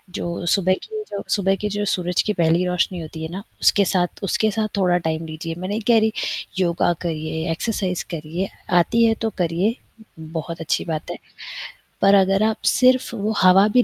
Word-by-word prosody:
जो 175 0 -4
सुबह 185 +1 +3
की 435 -1 -6
जो 200 - -3
सुबह 195 -2 +1
की 210 - -1
जो 205 0 -2
सूरज 180 -2 0
की 210 - 0
पहली 170 -1 +2
रोशनी 180 0 0
होती 160 0 -7
है 160 - -4
ना, 190 +3 -6 0.2
उसके 200 - +4
साथ 180 -2 0
उसके 215 +3 +1
साथ 215 +1 -1
थोड़ा 180 -2 +3
टाइम 160 +1 -2
लीजिए। 165 +1 -6
मैं 185 +1 -4
नहीं 210 +2 -2
कह 235 -2 +6
रही 220 0 +2 0.5
योगा 175 -1 +2
करिए 160 0 -3
एक्सरसाइज़ 180 0 -2
करिए 165 +4 -4 0.3
आती 230 +7 +3
है 225 - +4
तो 225 - +1
करिए, 180 +5 +1 0.4
बहुत 160 +1 -6
अच्छी 165 - -1
बात 155 -2 -4
है, - - -6 0.8
पर 195 0 +6
अगर 195 +1 +3
आप 220 0 +1
सिर्फ़ 255 -1 +3
वो 215 0 -1
हवा 190 +2 +6
भी 250 - +6
185 Hz, 190 wpm, -22 LUFS, 165-205 Hz, 0.8 s, कह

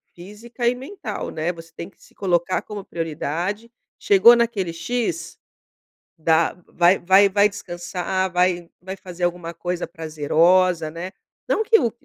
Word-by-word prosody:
física 220 +7 -6
e 245 - +2
mental 275 +11 -6
né 160 +2 -2
você 165 -1 -13
tem 170 - -8
que - - -30
se - - -20
colocar 180 -2 0
como 205 -2 -7
prioridade, 170 +7 -4 0.3
chegou 205 +4 +7
naquele 225 -8 0
X, 170 -3 -3 0.8
dá 160 +1 +2
vai 175 +2 +3
vai 190 +3 +5
vai 200 +1 +4
descansar, 185 0 -3
vai 180 -1 +1
vai 190 +1 -6
fazer 180 -2 -8
alguma 175 -1 -3
coisa 175 +1 -4
prazerosa, 165 +2 +2
né. 175 +3 -6 0.4
Não 440 - +2
que 450 +1 +5
o 230 - 0
180 Hz, 145 wpm, -22 LUFS, 170-200 Hz, 0.8 s, chegou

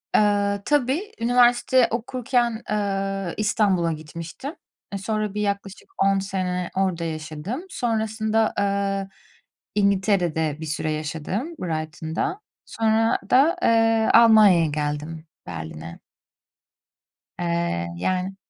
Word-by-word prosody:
Eee, 205 -1 +2
tabii, 295 - +1
üniversite 245 +1 +4
okurken, 240 0 -1
eee, 195 -3 -1
İstanbul'a 200 -5 +1
gitmiştim. 165 - -7 0.4
E, - - -1
sonra 215 +1 -2
bir 210 - -2
yaklaşık 200 - -4
10 195 0 +3
sene 185 -2 -2
orada 185 -3 0
yaşadım. 155 - -5
Sonrasında, 220 -4 0
eee, 200 -1 0 0.7
İngiltere'de 190 -6 +1
bir 160 - -4
süre 155 0 -2
yaşadım, 160 - -4
Brighton'da. 160 - -3 0.3
Sonra 225 +1 +1
da, 300 +8 +4
eee, 225 -1 +3
Almanya'ya 215 -7 +7
geldim, 150 +2 -4 0.2
Berlin'e. 80 0 -7 1.4
Eee, 170 - -1
yani 185 - -2
195 Hz, 95 wpm, -23 LUFS, 165-225 Hz, 1.4 s, Almanya'ya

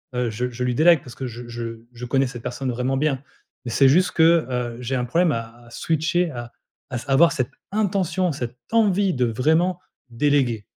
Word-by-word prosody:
heu, 125 -1 0
je 125 +4 -3
je 125 +1 -5
lui 125 -1 0
délègue 165 +1 +6
parce 120 -3 -12
que 130 - -5
je 120 +1 -8
je 115 -1 -7
je 125 +1 -7
connais 135 +2 +1
cette 120 -2 -8
personne 130 +1 -4
vraiment 125 +2 -1
bien. 140 -2 0 0.4
Mais 120 - -4
c'est 135 +3 +5
juste 180 +6 +3
que, 165 0 +4
heu, 120 -2 -3
j'ai 130 +2 -2
un 125 -1 -1
problème 165 +6 +2
à 115 0 -6
à - - -16
switcher 165 +5 0
à 120 -2 -7 0.4
à 125 - -5 0.2
avoir 170 +5 +6
cette 130 -7 -2 0.2
intention, 190 -4 0
cette 125 -3 -5
envie 205 -4 +3
de 125 -2 +1
vraiment 160 +10 +1 0.3
déléguer. 120 -4 +1
130 Hz, 200 wpm, -23 LUFS, 120-165 Hz, 0.4 s, délègue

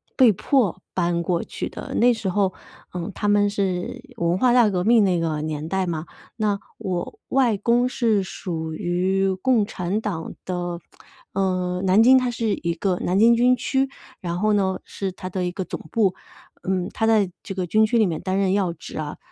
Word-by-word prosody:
被 250 -5 +6
迫 200 - +1
搬 170 -1 0
过 170 0 0
去 - - -5
的。 - - -8
那 245 +1 +5
时 220 -4 -3
候， 190 0 +1 0.4
呃， 180 +3 -4
他 205 - -2
们 205 0 +4
是 200 +5 -2
文 170 -2 +1
化 245 +3 +3
大 240 -4 +5
革 180 -3 -1
命 225 0 +5
那 180 -3 +2
个 160 -2 -1
年 155 0 -4
代 190 +1 -1
嘛， 165 -1 -3 0.3
那 210 -3 0 0.2
我 180 -2 -4
外 250 -5 +3
公 240 +4 +2
是 225 -6 +1
属 160 -4 -5
于 185 +3 0
共 235 -4 +3
产 190 +2 -2
党 180 -7 -4
的， 175 -1 -3 0.5
呃， 185 -1 0
南 190 +4 +5
京， 260 +2 +7
它 255 -1 +1
是 235 -1 -2
一 170 0 0
个 180 +2 -1
南 180 +2 0
京 230 +2 +6
军 250 +2 +4
区， 270 +1 0 0.3
然 175 -1 -3
后 215 +2 +2
呢 190 -2 +1
是 195 -1 -4
它 185 0 -7
的 185 0 -2
一 180 - -1
个 190 +1 -4
总 - - -5
部， 205 -5 +2 0.5
嗯， 185 -1 0
他 225 - 0
在 210 -5 +3
这 195 - -7
个 185 -1 -1
军 215 +5 +4
区 235 +2 +1
里 220 - +5
面 165 -4 -2
担 185 +1 -1
任 195 -1 +2
要 195 -4 +1
职 - - -10
啊。 150 -1 -5
190 Hz, 215 characters per minute, -23 LUFS, 180-220 Hz, 0.5 s, 京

